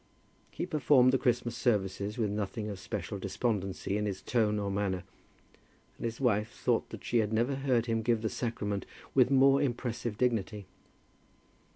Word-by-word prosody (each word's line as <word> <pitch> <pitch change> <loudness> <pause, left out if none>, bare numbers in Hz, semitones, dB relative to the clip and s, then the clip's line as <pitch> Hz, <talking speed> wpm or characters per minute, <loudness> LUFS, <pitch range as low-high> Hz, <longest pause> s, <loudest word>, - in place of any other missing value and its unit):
He - - -4
performed 140 -6 +4
the 135 - +3
Christmas 120 -1 0
services 105 -3 0
with 110 -4 0
nothing 105 +1 -3
of 100 -2 -6
special 100 0 -5
despondency 100 -1 -2
in 105 0 -1
his 95 -2 -4
tone 110 -4 +1
or 100 -1 -2
manner, 95 -2 -1 1.0
and - - -4
his 115 0 -3
wife 110 -4 +2
thought - - -1
that - - -9
she 120 - +1
had 105 -1 0
never 120 +5 +1
heard 130 -4 +1
him 115 -1 0
give 115 0 +1
the - - +1
sacrament 105 -4 -3 0.3
with 130 -2 +5
more 135 +1 +5
impressive 120 -4 -2
dignity. 110 -4 0
110 Hz, 165 wpm, -31 LUFS, 105-125 Hz, 1.0 s, with